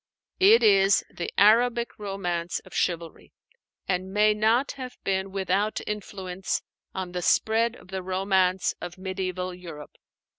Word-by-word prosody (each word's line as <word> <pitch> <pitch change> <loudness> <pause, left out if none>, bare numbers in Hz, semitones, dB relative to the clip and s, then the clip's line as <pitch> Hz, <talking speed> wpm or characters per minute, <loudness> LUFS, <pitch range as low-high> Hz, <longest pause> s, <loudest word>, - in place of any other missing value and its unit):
It 420 +5 +6
is 195 -1 +5
the 175 - -5
Arabic 235 +3 +3
romance 180 -4 -3
of - - -17
chivalry, 170 -2 -3 0.5
and 185 0 -2
may 210 +1 +4
not 225 +6 +2
have 255 -3 -8
been 190 0 -1
without 195 +2 0
influence 190 -3 -4 0.3
on 185 -2 -4
the 180 0 -3
spread 225 +6 +2
of - - -17
the 190 0 -4
romance 185 0 +1
of 175 - -6
mediæval 185 -1 -4
Europe. 155 -4 -10
190 Hz, 135 wpm, -26 LUFS, 180-210 Hz, 0.5 s, It